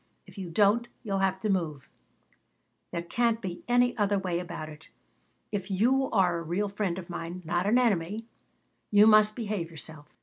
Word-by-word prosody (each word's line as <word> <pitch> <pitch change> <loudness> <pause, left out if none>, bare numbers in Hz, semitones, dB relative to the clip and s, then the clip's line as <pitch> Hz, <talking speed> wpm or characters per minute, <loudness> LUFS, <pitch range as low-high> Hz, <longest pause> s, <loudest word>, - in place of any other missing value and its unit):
If - - -16
you 190 -4 -6
don't 210 +7 +3 0.2
you'll 195 -4 -1
have 190 -1 +1
to 215 - -1
move. 155 -8 -2 1.0
There 170 - -4
can't 230 +5 +1
be 180 -5 -6
any 245 0 +3
other 205 -1 +2
way 180 -3 -1
about 165 -3 -6
it. 155 0 -13 0.6
If 200 -2 -3
you 250 +8 +2
are 175 -3 +2
a - - -5
real 180 +5 -1
friend 195 -3 -2
of 180 -2 -7
mine, 175 +1 -6
not 175 +3 0
an 225 +4 +4
enemy, 215 -2 +1 0.6
you 205 0 +6
must 215 -1 +6
behave 205 -7 -3
yourself." 155 -2 -10
195 Hz, 175 wpm, -28 LUFS, 170-215 Hz, 1.0 s, you